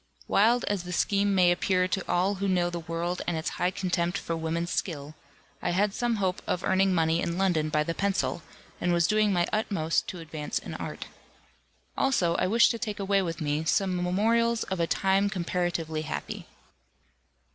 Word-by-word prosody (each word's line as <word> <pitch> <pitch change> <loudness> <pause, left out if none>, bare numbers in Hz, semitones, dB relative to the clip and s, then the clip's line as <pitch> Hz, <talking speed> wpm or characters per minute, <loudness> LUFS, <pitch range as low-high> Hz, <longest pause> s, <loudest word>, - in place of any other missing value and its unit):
Wild 230 +4 +3
as 205 -3 -1
the 180 +1 -7
scheme 200 +2 +2
may 180 -2 +5
appear 180 +1 +1
to 190 0 -1
all 185 +3 +2
who 200 - +1
know 175 -2 +1
the 175 - -3
world 170 +2 -3
and 175 -2 0
its 160 - -2
high 180 - +3
contempt 180 -2 -1
for 165 - -3
woman's 165 +2 -2
skill, 150 -4 -3 0.5
I - - -1
had 200 +2 +2
some 240 0 0
hope 190 -3 -1
of 180 - -1
earning 190 +1 +3
money 165 -1 +2
in 170 0 -2
London 175 -5 +1
by 150 0 +1
the 165 - -2
pencil, 195 -2 -1 0.4
and 175 0 +1
was 170 -1 +3
doing 215 +1 +3
my 175 -2 +2
utmost 195 -7 0
to 180 - -6
advance 155 -2 -4
in - - -6
art. - - -6 0.9
Also, 190 -11 +2
I - - +1
wished 230 +4 +5
to 230 - -4
take 215 -4 -4
away 195 0 +2
with 165 -2 -4
me 150 +1 0
some 185 +3 +1
memorials 225 +6 +1
of 190 -2 -4
a 170 - +1
time 195 +3 +2
comparatively 175 -4 -2
happy. 155 - -5
180 Hz, 190 wpm, -28 LUFS, 170-200 Hz, 0.9 s, may